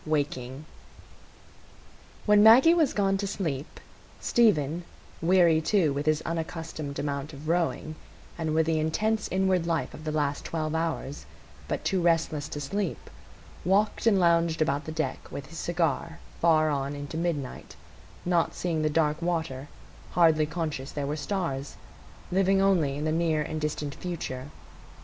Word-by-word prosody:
Waking 145 -2 -2 1.6
When 210 -1 +6
Maggie 245 +10 +8
was 325 -5 +3
gone 195 -1 +1
to 200 0 -2
sleep, 155 -8 -4 0.4
Stephen, 175 - +2 0.4
weary 170 -2 +4
too 165 -4 +2
with 145 +2 -3
his 155 0 +2
unaccustomed 160 -3 -4
amount 140 +1 -3
of 145 +2 -9
rowing, 165 -2 0 0.4
and 160 -2 -2
with 160 0 +3
the 160 -1 +1
intense 210 +8 0
inward 185 -2 +1
life 165 -1 -1
of 155 - -10
the 155 - -2
last 145 -2 -1
twelve 155 -1 -3
hours, 160 -3 -3 0.4
but - - -3
too 190 -3 +1
restless 160 -4 +1
to 145 - -5
sleep, 190 +6 -3 0.5
walked 205 +5 +2
and 200 -4 +5
lounged 170 -2 +3
about 145 -2 0
the 155 - -5
deck 155 0 -3
with 140 - -6
his 165 - -9
cigar 165 -1 -1 0.2
far 155 -2 +4
on 140 0 -2
into 145 +2 -7
midnight, 160 -5 -3 0.5
not 175 -2 +1
seeing 165 -3 -1
the 155 - +2
dark 150 0 +1
water, 160 -6 -2 0.5
hardly 160 -3 +4
conscious 150 -4 -4
there 145 -1 -3
were 145 +2 -2
stars, 145 -4 -3 0.6
living 195 +1 +3
only 180 -8 +2
in 150 - -3
the 155 - +1
near 160 -2 +1
and 155 0 -4
distant 150 -1 -2
future. 145 -7 -5
160 Hz, 150 wpm, -27 LUFS, 150-175 Hz, 1.6 s, Maggie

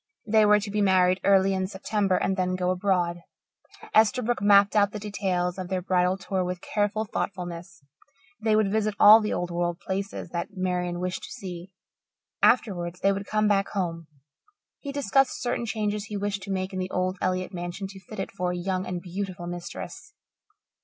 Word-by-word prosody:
They 215 -1 +4
were 210 0 +6
to 205 0 -5
be 210 0 0
married 185 -1 +4
early 195 -1 +4
in 190 0 -1
September 195 0 0
and 190 - 0
then 185 -1 0
go 180 0 0
abroad. 180 -2 0 0.7
Esterbrook 235 +1 +3
mapped 200 0 +5
out 205 -1 +3
the 210 - -4
details 190 -3 -2
of 185 - -4
their 185 -1 -2
bridal 180 0 +2
tour 190 -1 -2
with 180 0 -3
careful 210 +3 -1
thoughtfulness. 175 -5 -5 0.6
They 220 -1 +3
would 215 -2 +2
visit 215 -1 0
all 215 +2 +9
the 210 - -2
old 175 0 -2
world 175 0 -1
places 195 0 -4
that 170 0 -3
Marian 180 -1 -1
wished 180 0 -3
to - - -11
see. 180 -1 -8 0.7
Afterwards 180 -7 +2
they 195 - +4
would 195 0 -4
come 215 0 +1
back 200 -1 +2
home. 165 -5 -3 0.7
He 280 - -6
discussed 270 -1 +1
certain 245 -1 -2
changes 210 -1 -2
he 210 -1 -5
wished 200 0 -2
to 195 - -6
make 185 0 -2
in 185 - -3
the 185 0 -3
old 185 0 -1
Elliott 185 0 -1
mansion 175 +2 -5
to 195 -1 -11
fit 195 +3 -10
it 195 - -3
for 180 -2 -2
a 180 - -3
young 185 +1 -2
and 180 -1 -4
beautiful 185 -1 -5
mistress. 175 - -7
190 Hz, 185 wpm, -26 LUFS, 180-205 Hz, 0.7 s, all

